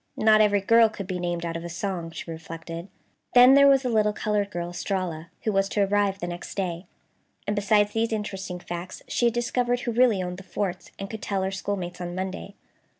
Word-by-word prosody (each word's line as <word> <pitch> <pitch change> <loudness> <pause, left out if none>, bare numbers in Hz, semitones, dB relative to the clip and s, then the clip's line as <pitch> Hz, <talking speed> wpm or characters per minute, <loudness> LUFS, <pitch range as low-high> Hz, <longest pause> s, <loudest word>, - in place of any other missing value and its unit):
Not 215 0 +5
every 205 -1 +3
girl 230 +3 +5
could 205 -2 -7
be 185 -1 -4
named 175 -1 -2
out 165 0 -3
of 165 - -4
a 170 - -5
song, 175 -1 -3
she 165 0 -7
reflected. 165 +1 -7 0.5
Then 250 +2 +9
there 280 0 +7
was 275 -1 +5
the 250 - 0
little 215 -2 +2
colored 205 -1 -1
girl 175 -2 -4
Estralla, 175 -2 -3
who 220 - +1
was 195 -1 +1
to 205 - 0
arrive 200 0 +1
the 175 - -4
next 175 0 -6
day, 180 -2 -3 0.6
and 205 - -1
besides 205 0 +3
these 225 0 0
interesting 195 -4 -4
facts, 175 +1 -7
she 240 - 0
had 235 0 +2
discovered 245 +1 0
who 240 - -2
really 230 -5 +3
owned 180 0 -5
the 190 - -10
forts, 185 -1 -4
and 195 - -5
could 220 +1 -7
tell 195 -2 -1
her 190 - -1
schoolmates 185 -2 -4
on 175 0 -4
Monday. 190 +2 -5
195 Hz, 215 wpm, -26 LUFS, 175-215 Hz, 0.6 s, Then